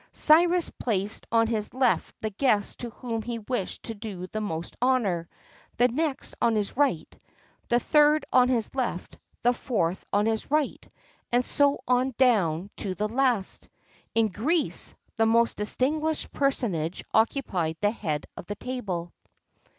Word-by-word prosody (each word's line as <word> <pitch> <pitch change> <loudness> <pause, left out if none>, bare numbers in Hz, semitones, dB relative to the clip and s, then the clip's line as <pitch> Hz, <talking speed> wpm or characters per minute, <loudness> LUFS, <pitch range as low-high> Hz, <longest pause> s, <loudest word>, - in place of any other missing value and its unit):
Cyrus 340 +3 +4
placed 205 -3 -2
on 230 0 +4
his 220 0 -2
left 255 -2 +1
the 220 - -2
guest 210 -2 +1
to 240 - -4
whom 230 -1 -4
he 235 +1 -4
wished 220 -3 -4
to 225 - -3
do 205 -4 -6
the 215 +3 -5
most 165 -5 -4
honour, 210 -10 +1 0.5
the 245 +1 +4
next 290 +2 -2
on 235 -1 +3
his 210 -2 -1
right, 270 - 0 0.5
the 240 - +4
third 300 +2 +4
on 250 -1 +6
the 240 -4 +1
left, 245 -9 -3 0.2
the 245 +1 +4
fourth 190 -9 -1
on 205 +1 +2
the 220 -1 0
right, 300 -1 -1 0.4
and 245 +1 +2
so 285 0 +2
on, 250 0 +2
down 200 -8 +2
to 190 -3 -3
the 210 +2 -1
last.[XXXII 230 -2 -1
59] - - +3
In 215 - -3
Greece, 310 +9 0 0.2
the 225 0 +3
most 230 +1 +3
distinguished 300 +9 0
personage 190 - -1
occupied 190 - +1
the 205 0 +2
head 155 -10 -3
of - - -9
the 205 - -4
table. 195 -10 -4
230 Hz, 155 wpm, -27 LUFS, 205-260 Hz, 0.5 s, on